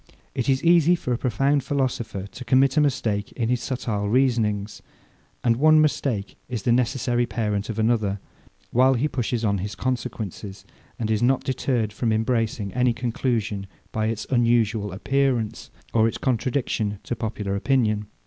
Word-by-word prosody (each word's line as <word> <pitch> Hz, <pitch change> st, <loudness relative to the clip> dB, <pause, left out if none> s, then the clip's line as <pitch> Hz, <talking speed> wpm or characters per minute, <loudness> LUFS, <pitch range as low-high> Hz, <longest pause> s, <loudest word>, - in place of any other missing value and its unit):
It 125 Hz, +1 st, -1 dB
is 135 Hz, 0 st, +2 dB
easy 170 Hz, 0 st, +5 dB
for 125 Hz, -7 st, -2 dB
a -, -, 0 dB
profound 135 Hz, +3 st, +1 dB
philosopher 125 Hz, -8 st, -2 dB
to 125 Hz, +5 st, -9 dB
commit 130 Hz, +2 st, +3 dB
a 155 Hz, -, +5 dB
mistake 110 Hz, -8 st, 0 dB
in 115 Hz, -2 st, -1 dB
his 125 Hz, -1 st, +1 dB
subtile 105 Hz, -6 st, -2 dB
reasonings; 110 Hz, -5 st, +1 dB, 0.6 s
and 115 Hz, -1 st, +3 dB
one 155 Hz, +3 st, +6 dB
mistake 135 Hz, -9 st, 0 dB
is 120 Hz, -5 st, -4 dB
the 120 Hz, -, +2 dB
necessary 120 Hz, 0 st, +1 dB
parent 105 Hz, -2 st, -2 dB
of 110 Hz, -, -4 dB
another, 110 Hz, -3 st, +1 dB, 0.5 s
while 130 Hz, +2 st, +4 dB
he 130 Hz, +5 st, +1 dB
pushes 120 Hz, -4 st, -2 dB
on 100 Hz, -2 st, +1 dB
his 100 Hz, +3 st, -4 dB
consequences, 105 Hz, -6 st, -4 dB, 0.3 s
and 110 Hz, -2 st, -2 dB
is 110 Hz, -, +1 dB
not 130 Hz, +2 st, +2 dB
deterred 120 Hz, -5 st, -1 dB
from 115 Hz, +2 st, -1 dB
embracing 110 Hz, -3 st, 0 dB
any 125 Hz, 0 st, +2 dB
conclusion, 115 Hz, -4 st, -2 dB, 0.2 s
by 110 Hz, 0 st, -1 dB
its 110 Hz, -1 st, -3 dB
unusual 115 Hz, -4 st, +2 dB
appearance, 125 Hz, +2 st, -1 dB, 0.2 s
or 110 Hz, -1 st, +4 dB
its 115 Hz, -, -3 dB
contradiction 120 Hz, -4 st, -1 dB
to 120 Hz, -, -3 dB
popular 105 Hz, -3 st, -3 dB
opinion. 105 Hz, -2 st, +1 dB
120 Hz, 160 wpm, -24 LUFS, 105-130 Hz, 0.6 s, one